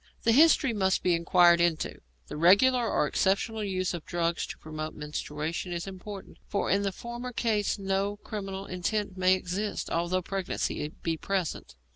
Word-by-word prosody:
The 230 - +4
history 275 -1 +5
must 190 -3 +1
be 180 - +3
inquired 170 0 +5
into; 170 -2 0 0.2
the - - -8
regular 225 +9 +5
or - - +2
exceptional 200 - 0
use 185 -2 -1
of 170 -3 -5
drugs 170 -1 -1
to - - -7
promote 155 0 -6
menstruation 150 +3 -4
is 170 0 -3
important, 195 +1 -9
for 200 - -1
in 200 - +3
the 200 -1 0
former 240 +4 -6
case 220 -4 0
no 195 +1 -1
criminal 195 -2 -6
intent 190 +2 -2
may 185 0 +4
exist, 190 +3 -3
although 175 +2 0
pregnancy 190 -5 -2 0.2
be 165 -1 -1
present. 185 - -3
190 Hz, 160 wpm, -28 LUFS, 170-205 Hz, 0.2 s, history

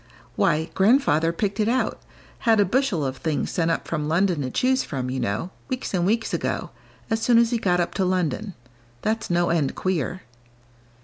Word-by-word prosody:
"Why, 160 +3 +1
Grandfather 190 - +3
picked 200 +5 -2
it 210 - +2
out 255 +2 0 0.4
had 225 -3 +3
a 205 - +5
bushel 195 - +1
of 130 0 -3
things 155 -2 -2
sent 170 -2 0
up 165 - -1
from 150 -3 -2
London 170 0 +1
to 130 - -2
choose 260 - +2
from, 130 -3 -4
you 130 - -2
know, 115 - -2 0.2
weeks 255 -5 -4
and 180 -1 +1
weeks 225 +2 0
ago, - - -2 0.4
as 225 0 +1
soon 235 0 +4
as 235 0 +4
he 235 - +1
got 180 -4 +1
up 175 - -1
to 195 - 0
London. 185 +2 -1 0.5
That's 220 +1 -1
no 175 -1 +2
end 155 -5 0
queer." 185 0 -2
180 Hz, 190 wpm, -24 LUFS, 160-220 Hz, 0.5 s, a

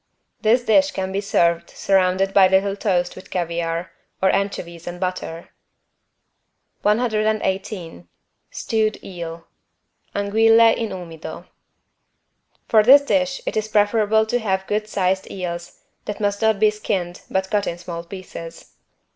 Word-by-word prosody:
This 235 +3 +3
dish 285 +6 +4
can 190 -9 -4
be 195 +1 -1
served 170 -4 +1
surrounded 190 0 +1
by 195 -2 +7
little 195 +1 +2
toast 180 -4 0
with 185 - -12
caviar, 170 0 -2 0.3
or 190 - +3
anchovies 175 -4 -3
and 175 0 -6
butter. 180 -2 -4 1.3
118 210 - -1 0.4
STEWED 220 -1 -1
EEL 170 -3 -7 0.7
(Anguille 225 +3 +5
in 225 -2 -3
umido) 165 -4 -8 1.2
For 220 - +5
this 270 +6 +7
dish 275 -1 0
it - - -3
is 215 0 -1
preferable 215 +1 +3
to 245 +3 0
have 190 -4 -1
good 210 +1 -1
sized 190 -2 -1
eels 175 -2 -6 0.2
that 210 - -5
must 205 0 -1
not 220 -2 +2
be 215 0 +5
skinned, 190 -4 -3
but 190 0 -1
cut 205 -1 +1
in 170 - -3
small 170 -1 -7
pieces. 170 -2 -10
195 Hz, 130 wpm, -21 LUFS, 175-215 Hz, 1.3 s, by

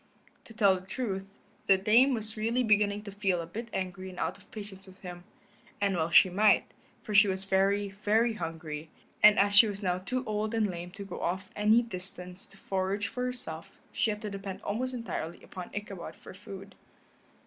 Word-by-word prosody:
To 225 - -12
tell 200 -4 +5
the 185 - -17
truth, 195 -5 -3 0.4
the 195 - +6
Dame 235 +7 +5
was 220 -1 -5
really 230 +3 +1
beginning 210 -2 +2
to 205 - -8
feel 195 -3 0
a 170 - -4
bit 225 +8 -6
angry 185 0 -4
and 180 - -11
out - - -1
of - - -19
patience 200 -2 -9
with 190 0 -15
him, 180 -1 -8 0.5
and 200 -1 +1
well 165 -1 0
she 180 - +7
might, 205 +3 +4 0.4
for 215 - -5
she 205 +1 +7
was 190 0 -2
very, 195 +1 +2
very 215 +4 +1
hungry, 160 -4 -5 0.3
and 210 0 +8
as 200 +1 +3
she 220 +2 +9
was 205 0 -5
now 180 -1 +1
too 250 +7 -3
old 215 +1 -1
and 215 -3 +1
lame 175 0 -6
to 200 +2 -9
go 185 - -7
off 190 +2 -2
any 215 +3 +4
distance 185 -3 -4
to 195 - -18
forage 195 +1 -1
for 250 0 -3
herself 170 -11 -6
she - - +1
had 210 +1 -3
to 210 - -4
depend 195 -1 -6
almost 255 +5 -2
entirely 175 -8 -5
upon 180 -1 -8
Ichabod 195 -6 -6
for - - -12
food. 195 0 -10
200 Hz, 200 wpm, -30 LUFS, 185-215 Hz, 0.5 s, she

